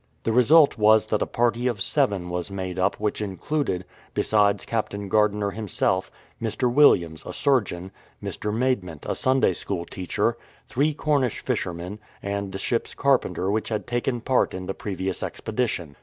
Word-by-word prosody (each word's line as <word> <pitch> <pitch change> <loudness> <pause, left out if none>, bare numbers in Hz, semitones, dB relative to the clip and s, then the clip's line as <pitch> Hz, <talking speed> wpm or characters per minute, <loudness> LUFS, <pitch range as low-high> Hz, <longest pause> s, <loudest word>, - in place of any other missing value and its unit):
The 115 - 0
result 135 +2 +5
was 110 0 +6
that 105 - 0
a - - +1
party 120 +1 +1
of 120 -5 -1
seven 100 -6 0
was 90 +2 -3
made 95 -2 -4
up 95 - +2
which 105 0 -2
included, 100 -1 -2 0.3
besides 100 -2 +2
Captain 100 -3 -2
Gardiner 105 -1 +2
him 110 +2 -6
self, 95 0 +1 0.3
Mr. 120 +2 0
Williams, 85 - +4
a - - -6
surgeon; 100 -10 0 0.3
Mr. 105 - -4
Maidment, 105 - -1
a - - -1
Sunday 130 -7 +2
school 85 0 -4
teacher; 90 0 -1 0.3
three 145 +3 +1
Cornish 140 -6 +1
fishermen, 90 +4 -3 0.2
and 100 -1 -3
the 95 - -4
ship's 115 +4 -2
carpenter 125 - +1
who 110 +1 +1
had 110 -2 -2
taken 120 0 -1
part 130 -4 +1
in 95 0 -5
the 95 - -3
previous 95 -2 -3
expedition. 105 - -3
105 Hz, 160 wpm, -25 LUFS, 95-120 Hz, 0.3 s, was